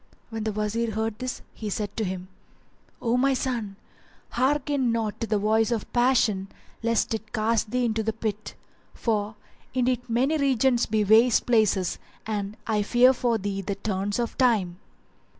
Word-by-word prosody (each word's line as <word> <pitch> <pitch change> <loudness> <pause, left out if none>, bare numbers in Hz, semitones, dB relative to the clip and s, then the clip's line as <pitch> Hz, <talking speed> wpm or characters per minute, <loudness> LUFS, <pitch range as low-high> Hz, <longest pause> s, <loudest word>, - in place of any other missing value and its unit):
When 220 -1 -4
the 220 - 0
Wazir 215 +2 -1
heard 220 0 -2
this, 255 0 -4
he 215 - -5
said 205 0 -3
to 225 - -1
him, 185 -1 -4 0.8
"O 235 0 +2
my 270 +1 +3
son, 235 -6 -2 0.6
hearken 270 0 +1
not 225 -2 -2
to 230 - -1
the 215 0 +1
voice 220 +2 +2
of 230 -3 -3
passion 240 -6 +2 0.3
lest 230 0 +1
it 220 -1 -5
cast 220 0 0
thee 250 +2 0
into 220 -1 0
the 220 0 0
pit; 215 -1 -4 0.4
for 215 -2 -1 0.4
indeed 250 -1 0
many 265 +7 +1
regions 265 -3 +2
be 215 -1 +1
waste 220 +3 +5
places 215 -6 +2 0.3
and 210 -1 -3
I 215 -2 +1
fear 245 +5 +5
for 240 -2 +1
thee 195 -1 -3
the 195 +1 -3
turns 200 0 -2
of 240 -1 -2
Time." 205 -9 +2
225 Hz, 165 wpm, -26 LUFS, 210-245 Hz, 0.8 s, waste